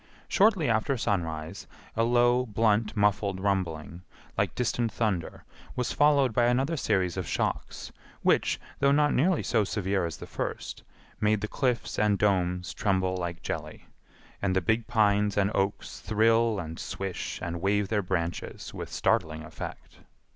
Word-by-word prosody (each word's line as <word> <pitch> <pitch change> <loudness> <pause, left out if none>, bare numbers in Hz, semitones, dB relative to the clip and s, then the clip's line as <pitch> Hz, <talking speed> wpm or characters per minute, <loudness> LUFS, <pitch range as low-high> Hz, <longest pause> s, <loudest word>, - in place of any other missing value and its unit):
Shortly 195 -7 +3
after 115 +4 +1
sunrise 80 -7 -2 0.3
a 115 - +2
low, 120 +1 +3
blunt, 105 0 +1
muffled 100 -2 +1
rumbling, 90 -4 -2 0.3
like - - 0
distant 120 -1 0
thunder, 100 -7 -2 0.3
was 125 -4 -1
followed 140 -4 +4
by 120 +1 +3
another 130 +7 +1
series 95 - 0
of 90 -5 -3
shocks, - - -3 0.3
which, - - +2 0.2
though 140 0 +4
not 150 +1 +3
nearly 175 +5 +2
so 110 -3 +2
severe 95 -2 -1
as 80 - -7
the - - -8
first, - - -5 0.4
made 105 0 +2
the 110 - -2
cliffs 125 0 -1
and 105 -1 +3
domes 90 -3 +1
tremble 95 -2 0
like 85 -2 -4
jelly, - - -5 0.6
and 95 -1 +1
the - - +4
big 110 +6 0
pines 105 -3 +2
and 100 0 +2
oaks 100 +1 -2
thrill 115 +1 +2
and 80 -2 -6
swish 95 -2 -4
and 85 0 -4
wave 100 +1 +1
their 105 -2 +1
branches 85 -3 -3
with - - -7
startling 80 0 0
effect. 75 - -9
105 Hz, 150 wpm, -28 LUFS, 95-115 Hz, 0.6 s, followed